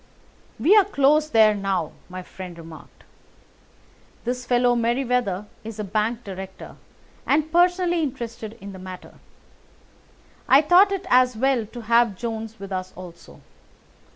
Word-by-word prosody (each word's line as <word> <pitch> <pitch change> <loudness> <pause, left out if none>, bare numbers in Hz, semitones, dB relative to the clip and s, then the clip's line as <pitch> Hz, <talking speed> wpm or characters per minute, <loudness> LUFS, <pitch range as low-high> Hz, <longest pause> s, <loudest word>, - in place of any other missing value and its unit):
"We 330 - +5
are 415 - +7
close 300 -3 +2
there 220 -5 +5
now," 195 -1 -2 0.2
my 185 0 -7
friend 180 -2 -10
remarked. 165 -1 -13 1.2
"This 245 0 -4
fellow 245 0 +3
Merryweather 235 -4 0 0.2
is 220 -1 -8
a 215 - -3
bank 215 +4 -2
director, 190 -1 -9 0.5
and 310 +2 +1
personally 350 0 +2
interested 230 -5 -5
in 200 0 -9
the 190 - -10
matter. 185 0 -11 1.3
I 275 +3 +7
thought 360 +6 +5
it 390 -1 -3
as 250 -2 +4
well 255 -3 +1
to 240 +2 -9
have 230 -2 +2
Jones 225 -1 -5
with 195 0 -9
us 185 0 -4
also. 175 -2 -12
230 Hz, 135 wpm, -23 LUFS, 195-270 Hz, 1.3 s, are